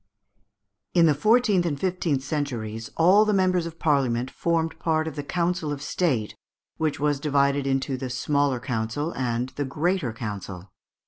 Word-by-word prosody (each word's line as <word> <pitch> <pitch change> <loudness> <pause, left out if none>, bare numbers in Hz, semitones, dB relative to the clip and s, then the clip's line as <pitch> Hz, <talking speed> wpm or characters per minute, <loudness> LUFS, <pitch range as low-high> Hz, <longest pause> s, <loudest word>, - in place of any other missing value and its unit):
] 100 -2 -56
In 170 -1 +6
the 155 - +5
fourteenth 215 - +3
and 150 -5 -2
fifteenth 175 -7 -1
centuries 115 -8 -3
all 185 +6 +6
the 210 -1 +1
members 185 -3 +2
of 165 0 -9
Parliament 130 -6 +1
formed 165 -1 -1
part 160 -1 0
of 160 - -5
the 145 - -3
council 170 0 -1
of 145 - -3
State, 140 - -1 0.4
which 155 -2 -1
was 145 -1 +1
divided 140 -1 +1
into 135 0 0
the 130 0 -5
Smaller 140 +1 0
Council 125 +5 -2
and 125 0 -1
the 145 - -1
Greater 170 -5 +1
Council. 100 -4 -7
145 Hz, 165 wpm, -25 LUFS, 125-170 Hz, 0.4 s, In